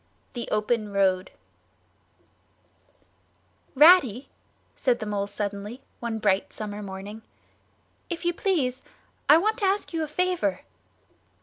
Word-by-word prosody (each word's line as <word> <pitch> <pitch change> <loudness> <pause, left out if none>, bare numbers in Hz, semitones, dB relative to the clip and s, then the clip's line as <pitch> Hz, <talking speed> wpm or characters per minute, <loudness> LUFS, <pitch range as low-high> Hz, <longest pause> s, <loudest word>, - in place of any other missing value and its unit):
THE 240 - -5
OPEN 215 0 0
ROAD 190 -2 +1 2.5
"Ratty," 285 - +6 0.5
said 250 -3 +1
the 220 - -6
Mole 200 -1 -2
suddenly, 205 +4 -5 0.2
one 235 -2 -3
bright 200 -3 +1
summer 210 -1 -6
morning, 200 +2 -8 0.9
"if 340 0 -4
you 345 - +2
please, 290 - 0 0.5
I 300 - +9
want 430 +6 +1
to 410 - +1
ask 390 -1 0
you 325 - -1
a 310 - -2
favour." 315 - 0
235 Hz, 115 wpm, -26 LUFS, 205-325 Hz, 2.5 s, I